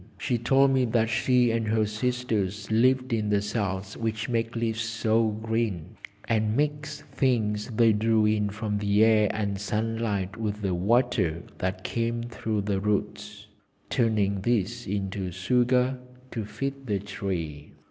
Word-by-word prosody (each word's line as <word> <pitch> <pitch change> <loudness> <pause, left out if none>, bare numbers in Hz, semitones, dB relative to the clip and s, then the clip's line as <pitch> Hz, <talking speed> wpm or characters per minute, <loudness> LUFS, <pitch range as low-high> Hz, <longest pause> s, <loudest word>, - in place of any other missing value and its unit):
She 120 -2 -1
told 135 +4 +4
me 130 -1 +3
that 115 -1 +1
she 120 +1 +3
and 115 -1 -1
her 110 0 +2
sisters 105 -3 -2
lived 130 +2 +3
in 105 -2 0
the 105 -1 +3
cells 100 -2 -3
which 110 0 -3
make 115 0 -1
leaves 115 -1 -1
so 115 -1 +1
green, 110 -5 -2 0.3
and 110 -1 +1
mixed 145 0 -2
things 115 -6 0
they 115 -1 +3
drew 110 +1 +2
in 105 -1 +2
from 105 0 -3
the 105 +1 +4
air 110 -2 +4
and 100 -2 -2
sunlight 105 -2 -2
with 105 -2 -3
the 95 -2 0
water 95 -4 +1 0.2
that 95 0 -2
came 115 0 -1
through 110 -3 -2
the 100 -1 -1
roots, 105 0 -2 0.5
turning 105 -4 +1
these 120 +1 -1
into 95 -1 -2
sugar 125 +7 +1 0.3
to 110 -3 -3
feed 135 +4 -5
the 105 -2 +1
tree. 90 -7 -5
110 Hz, 145 wpm, -27 LUFS, 100-120 Hz, 0.5 s, told